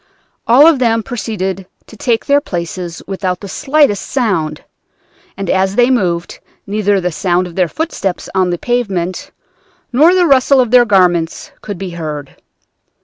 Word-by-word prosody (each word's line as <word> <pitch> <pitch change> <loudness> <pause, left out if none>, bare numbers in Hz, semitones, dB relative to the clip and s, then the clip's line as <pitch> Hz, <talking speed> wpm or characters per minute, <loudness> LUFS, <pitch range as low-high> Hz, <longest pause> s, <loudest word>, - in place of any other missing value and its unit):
All 255 +6 +7
of 320 -5 +5
them 230 -2 +1
proceeded 195 -6 -4 0.2
to - - -14
take 230 +1 -1
their 285 0 +3
places 175 - -5
without 185 -2 -3
the 200 - -8
slightest 270 -2 +1
sound, 185 - -1 0.7
and 195 - -4
as 190 +2 +1
they 245 +2 +4
moved 175 -8 -1 0.3
neither 205 -1 0
the 180 -1 -2
sound 180 +1 0
of 175 - -9
their 180 0 +1
footsteps 200 - -3
on 185 -1 +1
the 175 - -1
pavement, 205 - -2 0.6
nor 315 +8 +5
the 360 -1 +3
rustle 275 -2 +4
of 245 -3 +1
their 250 -1 +6
garments 175 -5 +1
could 205 -3 -6
be 190 -1 -6
heard. 150 -4 -6
195 Hz, 155 wpm, -15 LUFS, 180-245 Hz, 0.7 s, All